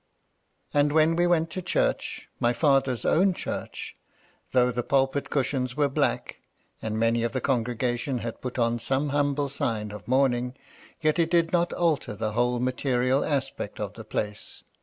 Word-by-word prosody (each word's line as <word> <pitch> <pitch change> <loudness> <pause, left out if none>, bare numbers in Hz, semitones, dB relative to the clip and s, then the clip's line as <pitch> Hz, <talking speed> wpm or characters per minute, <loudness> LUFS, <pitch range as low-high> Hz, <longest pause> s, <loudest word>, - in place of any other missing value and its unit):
And 145 0 +3
when 160 +2 +4
we 175 +1 +3
went 165 -1 +2
to 185 - -4
church, 175 - -1
— - - -37
^my 120 0 +2
father's 135 -3 +2
own 185 +2 +3
church, - - -5 0.3
— - - -35
though 125 -1 +4
the 120 0 -1
pulpit 135 +2 +1
cushions 130 -1 -1
were 145 -1 +3
black, 135 - -1 0.4
and 110 0 -3
many 115 +1 +2
of 115 - -1
the 130 - 0
congregation 125 0 -1
had 115 0 -5
put 125 0 -5
on 120 -1 +1
some 135 +5 0
humble 145 0 +1
sign 110 -6 -2
of 105 - -10
mourning, 125 -1 +2 0.5
yet 155 +1 +2
it 165 -1 +3
did 170 -1 +2
not 175 0 +2
alter 160 -10 0
the 110 +1 -2
whole 120 +2 +1
material 130 +1 +1
aspect 135 -7 -2
of 105 -1 -4
the 110 - -9
place. 105 -1 -4
130 Hz, 175 wpm, -26 LUFS, 120-145 Hz, 0.5 s, when